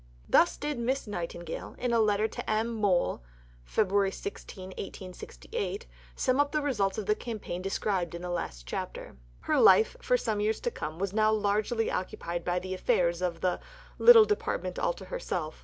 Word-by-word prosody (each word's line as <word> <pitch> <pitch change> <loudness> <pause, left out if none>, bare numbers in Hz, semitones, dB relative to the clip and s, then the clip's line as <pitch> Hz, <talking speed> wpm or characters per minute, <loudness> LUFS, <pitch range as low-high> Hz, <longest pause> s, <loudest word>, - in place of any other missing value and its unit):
Thus 345 - +4
did 295 -3 -3
Miss 260 +3 -1
Nightingale, 175 -4 -5
in 245 -1 -1
a 230 - +4
letter 215 0 +3
to - - -6
M. 220 +2 +1
Mohl 200 - +1 0.5
(Feb. 200 -2 +2
16, 190 - -7
1868), 300 - -6 0.3
sum 255 +1 +1
up 285 0 +3
the 305 - +1
results 205 -9 0
of 215 - -3
the 210 - +3
campaign 215 -5 -5
described 190 -3 -1
in 170 - -7
the 180 - -3
last - - -4
chapter. 60 - -5 0.3
Her - - +1
life, 190 +4 +6
for - - +2
some 220 - -1
years 215 +1 0
to 485 - -1
come, 155 - -5
was 195 +1 -2
now 215 0 +3
largely 215 +2 +1
occupied 175 -2 -4
with 180 0 0
the 185 0 -4
affairs 175 -2 +1
of 175 -2 -2
the 180 -1 +1 0.4
"little 465 -2 +9
Department 430 +4 -2
all - - +1
to - - -11
herself." 180 - -4
205 Hz, 175 wpm, -29 LUFS, 180-240 Hz, 0.5 s, little